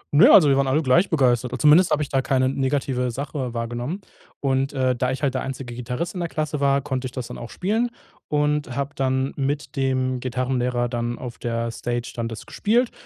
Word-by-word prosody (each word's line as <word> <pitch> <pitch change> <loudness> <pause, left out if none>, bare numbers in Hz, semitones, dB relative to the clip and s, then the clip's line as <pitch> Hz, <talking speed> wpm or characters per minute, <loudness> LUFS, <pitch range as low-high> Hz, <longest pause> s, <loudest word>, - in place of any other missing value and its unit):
Ne, 200 - +8
also, 155 - +8
wir 140 - +4
waren 135 -1 +2
alle 150 +5 +2
gleich 160 +9 +4
begeistert. 125 -4 +1
Zumindest 155 +7 +6
habe 150 0 +2
ich 140 - -6
da 135 -1 +1
keine 130 -1 +1
negative 130 -1 0
Sache 130 -1 -4
wahrgenommen. 120 - -3 0.4
Und, 135 0 +1
äh, 130 -2 +1
da 125 +1 0
ich 130 +2 -5
halt 135 - +2
der 130 - -1
einzige 130 -2 -5
Gitarrist 125 +8 -4
in 185 - -5
der 170 -1 -2
Klasse 155 -2 -2
war, 140 0 +3
konnte 130 -2 -3
ich - - -9
das 125 -2 -5
dann - - -8
auch 120 - -7
spielen 220 +6 0 0.4
und 150 -3 0
habe 140 +2 -2
dann 130 0 0
mit 140 +2 -2
dem 130 -1 0
Gitarrenlehrer 125 -1 -1
dann 120 0 -3
auf 120 -2 -8
der 115 0 -2
Stage 120 +1 -3
dann 115 -1 -2
das 115 -1 -7
gespielt 235 +3 +1
130 Hz, 210 wpm, -23 LUFS, 125-145 Hz, 0.4 s, Ne